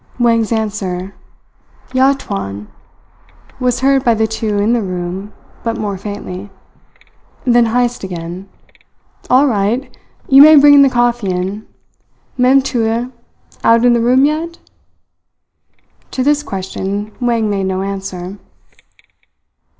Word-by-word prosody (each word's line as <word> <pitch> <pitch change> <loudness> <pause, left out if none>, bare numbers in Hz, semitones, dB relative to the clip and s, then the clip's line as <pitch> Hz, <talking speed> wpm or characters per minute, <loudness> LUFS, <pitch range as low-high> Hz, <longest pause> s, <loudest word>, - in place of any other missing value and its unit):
Wang's 230 -2 +1
answer, 200 -4 -3 0.8
"Ya 265 +2 +4
tuan," 105 - -6 0.9
was 250 -1 0
heard 270 0 +3
by 235 -1 +3
the 220 0 +1
two 220 -1 -2
in 210 +3 +1
the 240 - +1
room, 185 +1 -5 0.3
but 230 -1 -3
more 205 -2 -3
faintly. 200 -1 -7 1.0
Then 240 -2 +4
Heyst 240 0 -1
again: 180 +1 -7 0.8
"All 260 +3 +5
right! 230 +2 -1 0.3
You 270 +1 +7
may 310 +2 +9
bring 285 0 +7
the 275 - +5
coffee 240 -4 0
in. 185 +4 -3 0.7
Mem 260 +2 +4
Putih 235 -1 -1 0.5
out 230 +1 +4
in 245 - +5
the 235 - +1
room 255 +3 +4
yet?" 325 +3 -2 1.5
To 255 - -2
this 295 +1 +2
question 200 -1 -5
Wang 235 -3 0
made 195 -2 -1
no 190 0 -2
answer. 195 -1 -6
225 Hz, 120 wpm, -15 LUFS, 195-250 Hz, 1.5 s, may